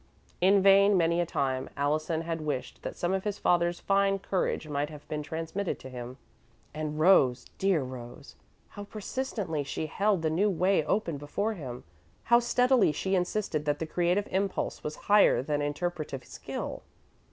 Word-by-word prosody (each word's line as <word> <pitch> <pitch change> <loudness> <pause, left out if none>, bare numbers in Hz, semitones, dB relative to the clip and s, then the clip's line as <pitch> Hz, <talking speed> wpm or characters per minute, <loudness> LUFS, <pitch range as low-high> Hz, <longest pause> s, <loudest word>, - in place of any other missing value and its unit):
In 195 +1 +5
vain, 200 0 +6
many 170 0 +2
a 170 - -1
time, 130 -3 -1
Allison 155 +3 0
had 165 -1 -3
wished 145 -4 -4
that - - -5
some 175 +2 -1
of 190 -1 -1
his 205 -1 -2
father's 175 0 +1
fine 195 0 +2
courage 185 -4 -2
might 145 0 -2
have 150 -1 -12
been 150 -1 -3
transmitted 165 +6 -3
to 130 - -11
him. 125 +1 -7 0.6
And 155 0 -4
Rose 140 -8 +4
dear 190 -7 +2
Rose! 125 -2 -9 0.3
How 205 - -8
persistently 205 - -3
she 145 - -4
held 195 +2 0
the 160 - +1
new 195 +6 +2
way 185 -1 +2
open 170 -7 0
before 200 +10 -2
him; 130 - -7 0.4
how 235 0 +5
steadily 245 - +3
she 190 +6 -2
insisted 180 -4 -1
that 145 -1 +1
the 160 - -3
creative 180 +5 0
impulse 195 +1 -1
was 150 0 -4
higher 205 -10 +5
than 145 +1 -1
interpretative 145 -2 -3
skill! - - -6
170 Hz, 165 wpm, -29 LUFS, 150-195 Hz, 0.6 s, vain